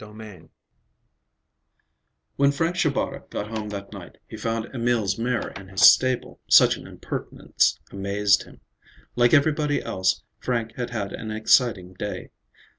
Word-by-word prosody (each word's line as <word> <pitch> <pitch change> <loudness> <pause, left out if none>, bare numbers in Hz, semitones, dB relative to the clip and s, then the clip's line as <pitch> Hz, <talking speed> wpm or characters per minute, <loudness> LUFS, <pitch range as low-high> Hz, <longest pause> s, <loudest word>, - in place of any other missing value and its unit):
VII 105 -6 -12 1.9
When 140 0 +3
Frank 165 +4 -1
Shabata 155 -6 -1
got 105 - -5
home 105 -1 -4
that 100 -1 -7
night, - - -11
he - - -9
found 115 +1 -4
Emil's 115 -5 0
mare 120 +1 -1
in 100 -1 -11
his 95 0 -4
stable. 130 -1 +3
Such - - +7
an - - -11
impertinence - - -2
amazed 100 +1 +1
him. - - -17 0.5
Like 120 0 +4
everybody 150 0 +2
else, 95 0 -1 0.2
Frank 115 -3 -2
had 120 -1 -4
had 105 -5 -4
an 110 - -6
exciting 110 -3 +2
day. 105 +2 -6
110 Hz, 135 wpm, -24 LUFS, 100-125 Hz, 1.9 s, Such